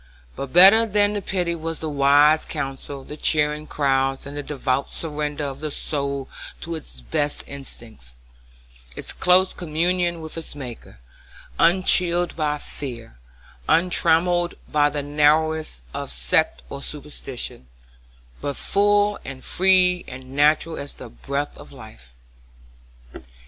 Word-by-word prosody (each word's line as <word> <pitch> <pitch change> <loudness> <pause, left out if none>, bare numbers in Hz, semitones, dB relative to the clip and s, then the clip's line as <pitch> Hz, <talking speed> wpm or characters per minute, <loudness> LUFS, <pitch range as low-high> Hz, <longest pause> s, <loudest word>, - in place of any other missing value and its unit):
But 140 -1 -6
better 195 +6 +8
than 205 0 +2
the 205 - -2
pity 180 -3 -1
was 165 -1 -4
the 160 - -5
wise 145 +2 +4
counsel, 135 -2 -5
the 150 - -8
cheering 150 0 +1
words, 135 -1 +1
and 140 +1 -8
the 145 - -3
devout 135 -1 -2
surrender 150 -2 -3
of 140 -1 -5
the 155 0 -3
soul 140 -2 -3 0.3
to 170 - -5
its 145 - -7
best 145 - -1
instincts; 115 - -8 0.8
its - - -4
close 185 +1 +4
communion 175 +1 0
with 160 -1 -7
its 160 - -6
Maker, 125 - -9 0.6
unchilled 175 0 +3
by 150 -2 -1
fear, 120 - -8 0.5
untrammelled 175 0 +3
by 145 -1 +2
the 145 -1 -4
narrowness 150 - +1
of - - -5
sect - - +1
or - - -7
superstition, 60 0 -6 0.7
but 140 -1 -3
full 205 0 +2
and 135 -1 -8
free 180 -1 +3
and 130 +1 -10
natural 155 +3 +3
as 140 - -6
the - - -11
breath 140 - -4
of - - -12
life. - - -14
150 Hz, 130 wpm, -22 LUFS, 135-170 Hz, 0.8 s, better